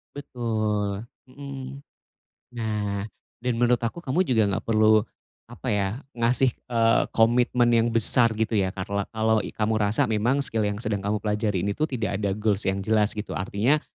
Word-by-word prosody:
Betul, 110 Hz, -6 st, -2 dB, 0.2 s
mhm. 135 Hz, 0 st, -8 dB, 0.7 s
Nah, 105 Hz, -3 st, -3 dB, 0.3 s
dan 125 Hz, +1 st, -1 dB
menurut 120 Hz, 0 st, +2 dB
aku 125 Hz, +9 st, -4 dB
kamu 135 Hz, +6 st, 0 dB
juga 115 Hz, -4 st, +3 dB
enggak 100 Hz, -1 st, -2 dB
perlu 110 Hz, -1 st, +5 dB, 0.5 s
apa 120 Hz, +2 st, -8 dB
ya, 100 Hz, -1 st, +1 dB, 0.3 s
ngasih, 120 Hz, +2 st, +3 dB, 0.2 s
eee, 115 Hz, -1 st, +3 dB
komitmen 120 Hz, +1 st, +3 dB
yang 115 Hz, 0 st, +3 dB
besar 115 Hz, +1 st, +3 dB
gitu 110 Hz, +1 st, -1 dB
ya, 100 Hz, -4 st, +2 dB
karla 100 Hz, +1 st, -3 dB
kalau 110 Hz, -1 st, +1 dB
i -, -, -4 dB
kamu 110 Hz, 0 st, 0 dB
rasa 105 Hz, +1 st, +2 dB
memang 120 Hz, +6 st, +1 dB
skill 115 Hz, -5 st, 0 dB
yang 105 Hz, -, -3 dB
sedang 105 Hz, -3 st, -2 dB
kamu 105 Hz, +2 st, -1 dB
pelajari 105 Hz, -3 st, -1 dB
ini 100 Hz, -, 0 dB
tuh 155 Hz, +8 st, -1 dB
tidak 110 Hz, -7 st, -2 dB
ada 100 Hz, -2 st, -1 dB
goals 105 Hz, -1 st, 0 dB
yang 95 Hz, +1 st, 0 dB
jelas, 105 Hz, 0 st, +3 dB
gitu. 105 Hz, -, -5 dB
Artinya, 115 Hz, +9 st, +1 dB
110 Hz, 170 wpm, -25 LUFS, 105-120 Hz, 0.7 s, perlu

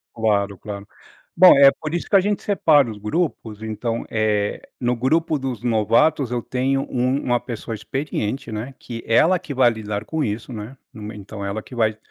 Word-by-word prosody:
Claro, 100 Hz, -3 st, 0 dB
claro. 100 Hz, +1 st, -8 dB, 0.5 s
Bom, 180 Hz, -2 st, +9 dB
é 140 Hz, 0 st, +8 dB
por 155 Hz, +1 st, -4 dB
isso 175 Hz, -, -3 dB
que 200 Hz, -, +4 dB
a -, -, +7 dB
gente 205 Hz, +2 st, -1 dB
separa 150 Hz, -, +3 dB
os 105 Hz, -, -8 dB
grupos. 110 Hz, -, -3 dB
Então, 110 Hz, +1 st, -3 dB
eh, 105 Hz, -2 st, -1 dB
no 120 Hz, -1 st, +1 dB
grupo 155 Hz, +6 st, +1 dB
dos 130 Hz, -4 st, -4 dB
novatos, 120 Hz, +5 st, +2 dB
eu 120 Hz, -1 st, -2 dB
tenho 135 Hz, +3 st, 0 dB
u -, -, -6 dB
uma 125 Hz, 0 st, +1 dB
pessoa 115 Hz, -1 st, -6 dB
experiente, 135 Hz, 0 st, -3 dB
né, 115 Hz, +6 st, -5 dB
que 115 Hz, -2 st, -7 dB
ela 160 Hz, +11 st, +4 dB
que 160 Hz, -5 st, -7 dB
vai 125 Hz, -2 st, +5 dB
lidar 105 Hz, -2 st, -4 dB
com 160 Hz, -1 st, -2 dB
isso, 110 Hz, +4 st, -4 dB
né. 110 Hz, +4 st, -7 dB, 0.2 s
No 110 Hz, -5 st, -10 dB
me 105 Hz, +1 st, -7 dB
então 100 Hz, 0 st, -8 dB
ela 100 Hz, +2 st, -3 dB
que 125 Hz, -, -12 dB
vai 110 Hz, -2 st, +1 dB
120 Hz, 195 wpm, -22 LUFS, 110-140 Hz, 0.5 s, Bom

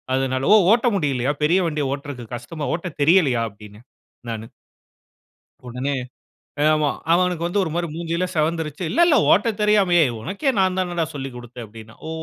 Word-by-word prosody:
அதனால" 130 Hz, +4 st, -1 dB
"ஓ! -, -, +9 dB, 0.2 s
ஓட்ட 240 Hz, +1 st, +2 dB
முடியலயா? 140 Hz, -5 st, 0 dB
பெரிய 175 Hz, +5 st, +3 dB
வண்டிய 150 Hz, -2 st, -2 dB
ஓட்டுறதுக்கு 140 Hz, -5 st, -8 dB
கஷ்டமா? 145 Hz, +6 st, -6 dB
ஓட்ட 175 Hz, +2 st, -6 dB
தெரியலையா?" 145 Hz, -7 st, +4 dB
அப்பிடீன்னேன், 105 Hz, +3 st, -15 dB, 0.4 s
நானு. 110 Hz, 0 st, -5 dB, 1.2 s
உடனே, 130 Hz, +4 st, -3 dB, 0.7 s
அ -, -, +3 dB
ஆமா. 155 Hz, -1 st, +1 dB, 0.2 s
அவனுக்கு 175 Hz, -1 st, +1 dB
வந்து 190 Hz, +4 st, -1 dB
ஒரு 170 Hz, -, -3 dB
மாரி 170 Hz, 0 st, -1 dB
மூஞ்சியெல்லா 170 Hz, +2 st, -2 dB
சிவந்துருச்சு. 160 Hz, +1 st, -1 dB
"இல்லல்ல, 340 Hz, -, +4 dB, 0.2 s
ஓட்டத் 215 Hz, +2 st, +2 dB
தெரியாம, 210 Hz, -4 st, +3 dB
ஏய்! 130 Hz, -6 st, +2 dB
உனக்கே 200 Hz, -, -2 dB
நான் 185 Hz, -1 st, +2 dB
தானடா 175 Hz, -3 st, -1 dB
சொல்லிக் 135 Hz, -3 st, -6 dB
குடுத்தேன்" 120 Hz, 0 st, -9 dB
அப்பிடீன்னான். 110 Hz, +1 st, -14 dB
"ஓ! -, -, -5 dB
155 Hz, 155 wpm, -21 LUFS, 125-180 Hz, 1.2 s, ஓ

